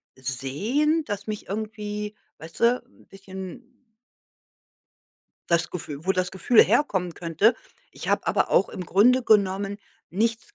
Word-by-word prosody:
sehen, 195 - 0
das 205 -1 -4
mich 210 -1 -5
irgendwie 210 0 -4 0.2
weißt 160 +1 -11
du, 240 +2 +3
'n 260 - -24
bisschen 195 +5 -10 1.8
das 170 -1 +2
Gefühl 155 -3 -7
wo 190 - +4
das 185 -1 -1
Gefühl 190 +5 +5
herkommen 190 - +1
könnte. 175 +8 +2 0.4
Ich - - -8
habe - - +1
aber - - +1
auch - - +4
im 180 - -6
Grunde 245 +9 +4
genommen 200 -2 +2 0.3
nichts 230 - -1
205 Hz, 130 wpm, -25 LUFS, 180-230 Hz, 1.8 s, Gefühl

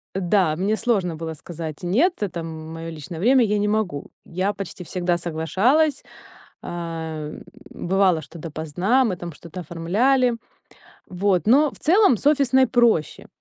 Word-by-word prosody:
Да, 185 -3 +2
мне 205 +4 0
сложно 200 -9 0
было 160 0 -5
сказать: 160 0 -7
"Нет, 255 - +2
это, 180 -4 -3
м 160 0 -7
моё 165 0 -6
личное 160 +1 -8
время, 255 +7 +4
я 210 0 0
не 210 - +1
могу". 205 -9 -2
Я 185 +4 -1
почти 190 -2 -7
всегда 175 0 -1
соглашалась, 195 - +1 0.6
ам, 160 -3 -5 0.3
бывало, 185 -2 +1
что 155 +4 -12
допоздна, 165 - 0
мы 185 - -1
там 170 -1 -7
что-то 170 +4 -10
оформляли. 225 - +1 0.7
Вот, 185 +1 0
но, 285 +6 +5
в - - -14
целом, 360 - +4
с - - -13
офисной 265 -3 +4
проще. 230 - +1
180 Hz, 150 wpm, -23 LUFS, 165-230 Hz, 0.7 s, но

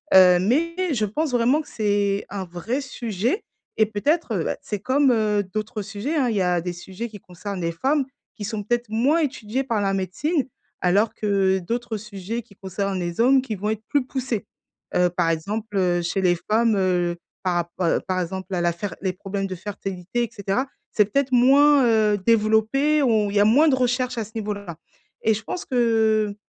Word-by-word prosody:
heu, 180 -1 +8
mais 295 - +1 0.2
je 215 -5 +1
pense 295 +9 -2
vraiment 250 +5 +3
que 300 - -14
c'est 205 -2 0
un 195 -1 -4
vrai 180 +10 -3
sujet 240 - -2 0.3
et 220 - +5
peut-être, 250 +7 0
heu, 165 - -1
bah, - - -2
c'est 210 - -4
comme, 265 +5 +3
heu, 210 -3 +2
d'autres 215 +3 -4
sujets, 210 +10 -4
hein, 265 -5 +2
il 220 - -1
y - - +2
a 180 -1 +1
des 175 +1 -4
sujets 190 +6 -7
qui 210 -2 -11
concernent 185 +2 -7
les 170 0 -1
femmes 270 - +1 0.3
qui 210 - -7
sont 210 0 -3
peut-être 240 +1 -1
moins 255 +9 +2
étudiés 260 -4 -2
par 230 -5 -1
la 195 -1 +1
médecine 255 - -1 0.4
alors 200 +5 +2
que 195 -2 +1
d'autres 230 +4 -3
sujets 210 +2 -5
qui 210 -2 -20
concernent 190 0 -3
les 175 +3 -2
hommes 265 +2 +5
qui 230 -4 -4
vont 205 +2 -3
être 220 0 -3
plus 285 -3 +1
poussés, 255 -4 -3 0.5
heu, 180 0 +4
par 175 -1 0
exemple, 210 +6 -3
heu, 175 -2 +2
chez 180 +3 -1
les 180 -2 +3
femmes, 225 +1 +3
heu, 180 -2 +1 0.3
par 180 -2 0 0.2
rappo 175 -3 +2
par 185 -1 0
exemple, 190 +2 -5
à 175 - 0
la 175 0 +2
fer 170 0 -5
les 190 0 0
problèmes 195 +1 -4
de 185 - -5
fertilité 195 +2 -4
et 235 - -3
cetera. 205 +4 -1 0.2
C'est 210 - +4
peut-être 270 +6 0
moins, 275 +3 +6
heu, 215 -3 +3
développé 225 +8 +3
ou 215 -5 +2
il - - -5
y - - +5
a - - +5
moins 280 +9 +5
de 270 - +4
recherches 250 0 0
à - - -1
ce 215 - -15
niveau-là 205 -6 -4 0.5
et 220 - +4
je 220 - -6
pense 360 - -5
que, 220 -4 +2
210 Hz, 205 wpm, -23 LUFS, 190-245 Hz, 0.5 s, heu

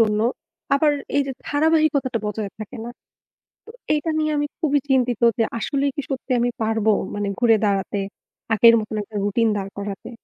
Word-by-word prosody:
জন্য। 210 -1 +3 0.5
আবার 295 +1 +3 0.2
এই 285 - +4
যে 270 - -3 0.2
ধারাবাহিকতাটা 290 -4 +2
বজায় 210 -1 -3
থাকে 215 +4 -8
না। 240 - -6 0.8
তো 450 - -11 0.2
এইটা 300 +2 -1
নিয়ে 310 0 +1
আমি 290 - +1
খুবই 290 -3 +2
চিন্তিত 250 -3 +2 0.2
যে 225 - +5 0.2
আসলেই 280 +4 0
কি 290 - -2
সত্যি 265 -1 -4
আমি 245 +1 +2
পারব? 220 -1 0 0.3
মানে 205 0 -2
ঘুরে 235 -2 +5
দাঁড়াতে, 200 0 0 0.5
আগের 230 +1 +7
মতন 215 0 -5
একটা 210 +1 -14
routine 220 +2 +2
দাঁড় 195 0 -5
করাতে? 200 -1 -6
235 Hz, 170 wpm, -22 LUFS, 210-285 Hz, 0.8 s, আগের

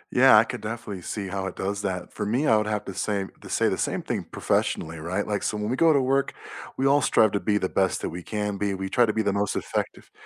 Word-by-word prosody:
Yeah, 130 -3 +8
I 105 - +7
could - - -6
definitely 110 -3 -5
see 100 +2 -4
how 95 0 -3
it - - -6
does 100 +1 -3
that. 95 -3 -4
For - - -4
me, 120 +8 0
I 110 - +5
would 105 0 +1
have 105 -1 -2
to 95 - -6
say 100 0 -1 0.2
to - - -11
say - - +2
the - - -1
same - - -1
thing - - -3
professionally, 80 0 -1
right? 90 +6 -2
Like, 105 -1 -2
so 105 - -1
when 105 0 -2
we - - +1
go 165 +3 +5
to 145 - +4
work, 135 +1 +1 0.4
we 135 - 0
all 140 +1 +4
strive 110 -4 +4
to 100 - 0
be 105 0 +1
the 95 - 0
best 95 0 0
that - - -2
we 90 - -6
can 105 +1 -3
be. 100 -1 0
We 95 0 -4
try 120 +4 +3
to 110 - 0
be 110 - 0
the 100 -1 +1
most 100 0 0
effective, - - -4
105 Hz, 280 wpm, -25 LUFS, 95-115 Hz, 0.4 s, Yeah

